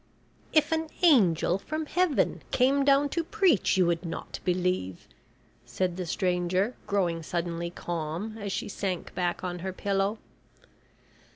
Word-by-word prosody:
"If 310 0 +3
an 320 0 0
angel 195 - +4
from 310 +8 -4
Heaven 360 -1 +1
came 270 +2 +3
down 280 +1 +4
to 335 +3 -1
preach 360 - +2
you 185 - +4
would 170 0 0
not 165 - -6
believe!" 180 - -1 0.6
said 175 +9 -2
the 180 -1 -4
stranger, 180 +5 0
growing 175 -5 0
suddenly 170 +1 -3
calm 175 +5 -4
as 200 -1 -4
she - - -3
sank 190 -3 -4
back 175 0 -1
on 180 -1 -3
her 190 +2 -4
pillow. 195 +2 -1
185 Hz, 135 wpm, -28 LUFS, 175-265 Hz, 0.6 s, angel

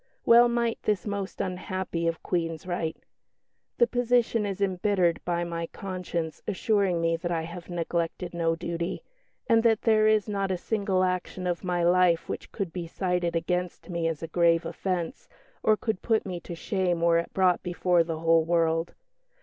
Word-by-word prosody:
Well 235 +1 +7
might 235 -1 0
this 210 -4 0
most 200 -2 -4
unhappy 185 -2 -3
of 165 -1 -2
Queens 165 -2 -2
write, 170 -3 -2 0.8
"The 475 - +6
position 245 - +1
is 195 -1 -4
embittered 190 -2 +1
by 175 -1 0
my 170 -1 -3
conscience 180 -4 -5
assuring 200 -3 +1
me 165 0 +1
that 175 +1 -4
I 165 -1 0
have 170 +1 -8
neglected 170 +1 -2
no 165 -1 +1
duty, 170 +1 -4 0.4
and 230 -3 +4
that 225 -2 +2
there 215 -1 +4
is 215 -1 +3
not 200 -2 -1
a 185 - 0
single 195 -1 0
action 185 0 -2
of 175 0 -2
my 175 -1 0
life 175 -1 +3
which - - -6
could 195 -6 -4
be 175 -2 -4
cited 180 -1 -1
against 180 +2 -2
me 170 -1 0
as 165 -1 -3
a - - -3
grave 170 0 +3
offence, 190 - -3 0.3
or 215 -1 +3
could 220 -4 -2
put 225 -2 +1
me 180 -3 -4
to 170 0 -8
shame 180 -1 -1
were 170 0 +4
it 170 - -5
brought 185 -2 +3
before 175 -1 +2
the 165 -1 -4
whole 165 0 +4
world. 165 0 +1
180 Hz, 175 wpm, -27 LUFS, 170-200 Hz, 0.8 s, Well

